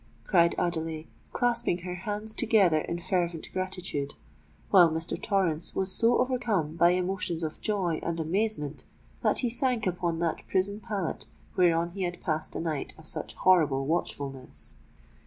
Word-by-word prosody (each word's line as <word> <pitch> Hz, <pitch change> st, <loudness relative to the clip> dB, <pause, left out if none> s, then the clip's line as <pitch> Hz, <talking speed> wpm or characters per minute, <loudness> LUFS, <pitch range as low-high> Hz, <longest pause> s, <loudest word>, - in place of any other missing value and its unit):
cried 170 Hz, +3 st, +4 dB
Adelais, 160 Hz, -2 st, -1 dB, 0.3 s
clasping 240 Hz, -6 st, +1 dB
her 180 Hz, 0 st, -4 dB
hands 210 Hz, +4 st, -4 dB
together 205 Hz, -10 st, +4 dB
in 170 Hz, -, -3 dB
fervent 175 Hz, -2 st, -1 dB
gratitude, 180 Hz, -6 st, -3 dB, 0.6 s
while 175 Hz, -3 st, +8 dB
Mr. 160 Hz, +1 st, -2 dB
Torrens 180 Hz, -6 st, 0 dB
was 190 Hz, 0 st, 0 dB
so 230 Hz, +4 st, +3 dB
overcome 225 Hz, -, 0 dB
by 170 Hz, +1 st, +5 dB
emotions 180 Hz, -1 st, 0 dB
of 155 Hz, -1 st, -4 dB
joy 190 Hz, -7 st, 0 dB
and 170 Hz, 0 st, -2 dB
amazement 160 Hz, -3 st, -1 dB, 0.4 s
that -, -, +2 dB
he -, -, +2 dB
sank 245 Hz, -3 st, +1 dB
upon 175 Hz, -2 st, -1 dB
that 165 Hz, -1 st, -1 dB
prison 200 Hz, +2 st, 0 dB
pallet 200 Hz, -6 st, -3 dB, 0.3 s
whereon 170 Hz, -2 st, +3 dB
he 195 Hz, +2 st, -6 dB
had 175 Hz, -1 st, -2 dB
passed 155 Hz, -3 st, -2 dB
a -, -, -2 dB
night 160 Hz, -4 st, -3 dB
of 160 Hz, -, -14 dB
such -, -, -5 dB
horrible 150 Hz, -7 st, +4 dB
watchfulness. 140 Hz, -4 st, -4 dB
175 Hz, 150 wpm, -28 LUFS, 160-195 Hz, 0.6 s, while